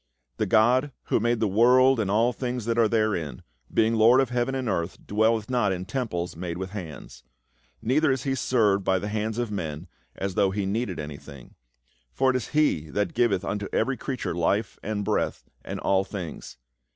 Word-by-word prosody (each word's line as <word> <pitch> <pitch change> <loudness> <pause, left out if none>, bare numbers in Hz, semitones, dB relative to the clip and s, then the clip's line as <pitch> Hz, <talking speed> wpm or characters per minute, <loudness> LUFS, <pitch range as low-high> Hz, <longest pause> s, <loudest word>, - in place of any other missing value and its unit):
" - - -51
The - - +1
God 125 +5 +3 0.2
who - - +3
made 120 +1 +1
the 110 - +2
world 125 +5 +5
and 105 -3 0
all 115 +4 +2
tilings 125 -2 -3
that 115 0 0
are 115 - +5
therein, 105 - -1 0.3
being 110 +1 +2
Lord 115 +3 +6
of 135 -2 +1
heaven 125 +2 0
and 130 -2 -2
earth, 85 -4 -2
dwelleth 110 +1 +1
not 120 -6 +1
in 90 0 -3
temples 100 -8 -3
made 85 0 -5
with 95 0 -5
hands. 80 - -8 0.6
Neither 140 +6 +3
is 130 -1 -1
he 135 - 0
served 110 -6 +2
by 95 - +2
the 100 +3 -4
hands 110 +1 -2
of 120 -3 -2
men, 80 -4 -4 0.3
as 95 -1 -3
though 100 0 +3
he 100 +1 -2
needed 100 -1 -2
an)i:hing; 70 -3 -9 0.6
for 130 - +2
it - - -3
is 125 - -2
he 145 - +1
that 100 +2 -1
givcth 120 -6 +2
unto 100 0 -2
every 135 - +1
creature 130 -6 -4
life 95 +6 0
and 105 -1 -3
breath, - - -1 0.2
and - - -5
all 95 0 +2
things. 95 -5 -7
110 Hz, 195 wpm, -26 LUFS, 95-120 Hz, 0.6 s, Lord